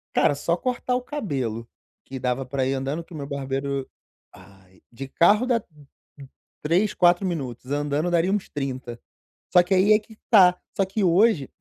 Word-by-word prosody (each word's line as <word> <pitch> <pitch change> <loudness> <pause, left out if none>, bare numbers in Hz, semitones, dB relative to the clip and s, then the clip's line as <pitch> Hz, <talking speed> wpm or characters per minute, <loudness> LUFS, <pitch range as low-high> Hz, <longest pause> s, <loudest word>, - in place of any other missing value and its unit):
Cara, - - +3
só 170 +4 -1
cortar 250 +1 -2
o 250 - -1
cabelo 135 - -4 0.4
que 135 - -7
dava 125 +1 -2
pra 130 0 -2
ir 135 - 0
andando, 135 +5 -3
que 175 - -16
o - - -8
meu 140 -1 -6
barbeiro 135 -1 -3 0.5
ai, 95 -1 -19
de 135 +3 -8
carro 210 - +3
dá 235 -4 0 1.0
3, 180 +7 +1
4 175 +2 +3
minutos, 135 -7 -5
andando 145 +3 -1
daria 175 +2 +2
uns 205 -2 -2
30. 130 -4 -5 0.5
Só 180 - +8
que 185 +2 -1
aí 195 +3 +5
é 210 - +4
que 220 +1 -18
tá, 180 -4 +6 0.2
só 195 - +3
que 195 +2 -2
hoje 180 - +3
155 Hz, 175 wpm, -24 LUFS, 135-195 Hz, 1.0 s, Só